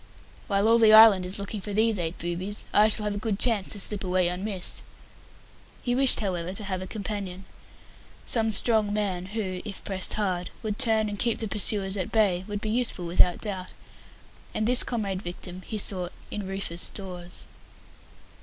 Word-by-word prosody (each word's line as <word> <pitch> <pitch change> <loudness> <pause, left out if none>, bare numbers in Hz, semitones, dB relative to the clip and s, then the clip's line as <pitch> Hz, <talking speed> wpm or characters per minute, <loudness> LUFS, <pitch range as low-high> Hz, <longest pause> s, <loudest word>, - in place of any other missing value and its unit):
"While 200 0 +1
all 230 +1 +5
the 220 -1 +6
island 215 -4 +8
is 185 - 0
looking 200 +1 -5
for 205 +1 -6
these 220 -1 +2
eight 165 0 -3
boobies, 180 +4 -5
I 210 +1 +6
shall 215 0 +4
have 210 -1 -1
a 205 - -4
good 210 -2 -2
chance 220 -4 +1
to 205 - -1
slip 200 0 0
away 180 -1 +1
unmissed." 185 +1 -4 1.0
He 245 - 0
wished, 260 -1 +5
however, 180 -3 -2
to 210 - -6
have 190 -2 -3
a 185 - -6
companion. 195 -3 -5 0.8
Some 225 -2 +1
strong 215 0 +3
man, 190 -4 -2
who, 190 -3 -4
if 205 -3 -7
pressed 190 -2 -2
hard, 185 -4 -2
would 210 -1 -3
turn 220 -4 +3
and 205 -1 -5
keep 235 -2 +1
the 225 - -4
pursuers 200 -1 +2
at 185 - -3
bay, 195 -5 +2
would 205 -1 -4
be 215 - -3
useful 230 -6 +1
without 175 +1 +3
doubt; 190 -4 -5 0.8
and 215 - 0
this 250 +1 +4
comrade 200 -6 -3
victim 180 0 -8
he 220 - -4
sought 185 -3 -1 0.2
in 205 -2 -5
Rufus 190 -3 -3
Dawes. 180 -3 -8
200 Hz, 180 wpm, -26 LUFS, 185-215 Hz, 1.0 s, island